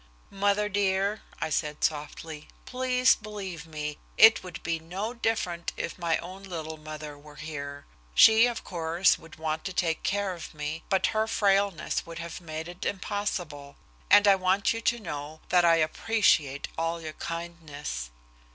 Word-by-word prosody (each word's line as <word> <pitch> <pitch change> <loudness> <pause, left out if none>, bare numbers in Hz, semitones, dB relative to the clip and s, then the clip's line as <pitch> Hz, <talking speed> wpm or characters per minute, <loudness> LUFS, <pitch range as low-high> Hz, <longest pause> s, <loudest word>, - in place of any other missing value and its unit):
"Mother 200 +1 +2
dear," 200 +1 +1 0.2
I 155 - -2
said 150 -1 -1
softly, 150 0 -3 0.2
"please 255 0 +3
believe 200 -6 -7
me, 150 -1 -5 0.2
it 225 0 +8
would 180 -2 -8
be 165 -1 -1
no 190 +8 -4
different 215 -8 -1
if 170 - -4
my 170 -2 +1
own 185 +3 -8
little 165 -5 -5
mother 155 -1 -8
were 150 0 -14
here. 145 -2 -6 0.3
She, 225 +2 +8
of 240 -1 -4
course, 170 +1 +2
would 165 0 -13
want 155 0 -3
to 185 - -3
take 165 -3 0
care 200 -1 0
of 170 -2 -9
me, 150 +2 -4
but 190 -2 +3
her 220 0 +1
frailness 200 -4 +1
would 165 0 -9
have 170 +1 -6
made 160 -1 -6
it 175 +1 -8
impossible. 180 -8 -3 0.3
And 205 - +7
I 200 - +9
want 190 +2 +2
you 225 - -4
to 235 +1 +1
know 155 -5 -6
that 180 0 +5
I 165 -1 +6
appreciate 155 -4 +2
all 165 +1 -1
your 155 -1 -6
kindness." 160 - -5
170 Hz, 160 wpm, -28 LUFS, 155-200 Hz, 0.3 s, I